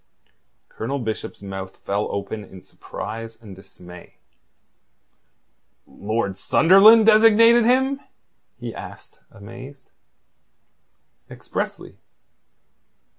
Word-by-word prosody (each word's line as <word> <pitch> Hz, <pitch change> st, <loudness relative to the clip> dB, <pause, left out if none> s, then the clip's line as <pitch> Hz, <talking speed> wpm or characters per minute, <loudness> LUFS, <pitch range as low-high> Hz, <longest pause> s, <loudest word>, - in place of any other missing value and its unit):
Colonel 135 Hz, +5 st, -5 dB
Bishop's 110 Hz, -4 st, -6 dB
mouth 95 Hz, -1 st, -8 dB
fell 100 Hz, +1 st, -3 dB
open 100 Hz, +2 st, -5 dB
in 95 Hz, -1 st, -14 dB
surprise 115 Hz, +1 st, -9 dB
and 105 Hz, -4 st, -13 dB
dismay. 90 Hz, -2 st, -15 dB, 1.7 s
"Lord 100 Hz, -2 st, -4 dB
Sunderland 210 Hz, +6 st, +6 dB
designated 225 Hz, +2 st, +5 dB
him?" 265 Hz, +3 st, +1 dB, 0.6 s
he -, -, -7 dB
asked, -, -, -12 dB
amazed. 125 Hz, +6 st, -13 dB, 1.4 s
"Expressly." -, -, -7 dB
115 Hz, 75 wpm, -21 LUFS, -, 1.7 s, Sunderland